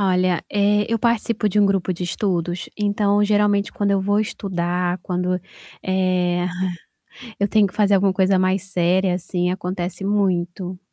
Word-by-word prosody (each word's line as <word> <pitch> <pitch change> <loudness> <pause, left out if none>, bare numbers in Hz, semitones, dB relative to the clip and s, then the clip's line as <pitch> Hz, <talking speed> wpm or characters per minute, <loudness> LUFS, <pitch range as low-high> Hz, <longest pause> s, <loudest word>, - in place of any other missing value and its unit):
Olha, 185 -2 +1
eh, 205 0 +2
eu 230 - +1
participo 230 -2 0
de 205 - 0
um 205 - +5
grupo 195 -2 0
de 180 0 -5
estudos, 175 -1 -2
então 205 0 +1
geralmente 205 -1 +2
quando 200 -1 -1
eu 195 - +2
vou 205 +2 +1
estudar, 180 -3 -2
quando, 180 0 -1 0.4
eh, 180 -1 +1 0.9
eu 200 - +2
tenho 210 0 +4
que 180 - -16
fazer 205 -1 +3
alguma 195 0 +3
coisa 190 0 +2
mais 185 0 +1
séria, 185 0 +1
assim, 180 0 -2
acontece 180 0 -4
muito. 185 -2 -1
190 Hz, 155 wpm, -21 LUFS, 180-205 Hz, 0.9 s, um